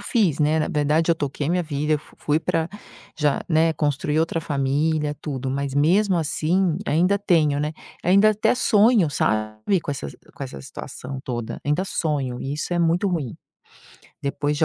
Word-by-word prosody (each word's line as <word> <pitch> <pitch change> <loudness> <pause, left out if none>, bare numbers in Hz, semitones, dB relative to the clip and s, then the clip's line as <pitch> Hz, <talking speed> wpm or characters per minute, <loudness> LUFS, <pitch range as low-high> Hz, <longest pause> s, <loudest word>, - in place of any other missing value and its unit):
fiz, 195 - +1
né. 155 +1 +2
Na 155 - 0
verdade, 150 +3 +2
eu - - +5
toquei 145 -1 -3
minha 180 +1 +1
vida, 150 -1 -1
eu 150 - +3
f - - -19
fui 150 +1 0
pra 165 0 0 0.5
já, 150 -2 +1
né, 160 0 +3
construi 150 0 0
outra 165 +1 0
família, 150 +1 0
tudo. 135 -3 -4
Mas 140 0 -2
mesmo 180 +7 +3
assim 165 +2 +1
ainda 180 +7 +2
tenho, 160 -7 +2
né. 150 +1 -1 0.3
Ainda 200 +4 +5
até 215 +3 +2
sonho, 220 -6 +4
sabe, 110 - 0
com 155 - -5
essas 130 - -5 0.2
com - - -8
essa 70 - -8
situação 130 - -8
toda. 120 -3 -5
Ainda 150 +6 +1
sonho, 140 -9 -2
e 135 - -3
isso 150 - -3
é 175 - +1
muito 170 +3 +2
ruim. 155 -10 -2 0.9
Depois 145 +1 -1
de 160 - +3
155 Hz, 175 wpm, -23 LUFS, 140-170 Hz, 0.9 s, eu